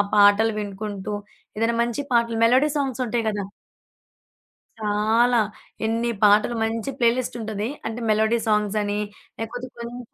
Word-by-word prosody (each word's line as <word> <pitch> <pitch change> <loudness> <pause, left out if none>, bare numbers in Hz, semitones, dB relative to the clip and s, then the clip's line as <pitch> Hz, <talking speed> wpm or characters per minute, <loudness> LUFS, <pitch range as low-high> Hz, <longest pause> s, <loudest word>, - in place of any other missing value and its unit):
పాటలు 205 +2 +5
వినుకుంటూ 205 0 -5 0.4
ఏదైనా 225 +2 +1
మంచి 235 +3 -2
పాటలు 235 -1 +2
మెలోడీ 255 +6 +5
సాంగ్స్ 265 -3 -2
ఉంటాయి 235 0 -1
కదా! 205 -1 -3 1.3
చాలా, 220 +3 +2 0.5
ఎన్ని 230 +1 0
పాటలు, 210 +3 +5
మంచి 225 +3 -2
ప్లేలిస్ట్ 240 +1 +1
ఉంటది. 215 0 -3 0.2
అంటే 225 +2 -4
మెలోడీ 220 +2 +3
సాంగ్స్ 210 -1 +1
అని, 205 0 -1 0.4
లేకపోతే 245 +3 -5
కొంచెం 235 +1 -6
225 Hz, 125 wpm, -23 LUFS, 210-235 Hz, 1.3 s, పాటలు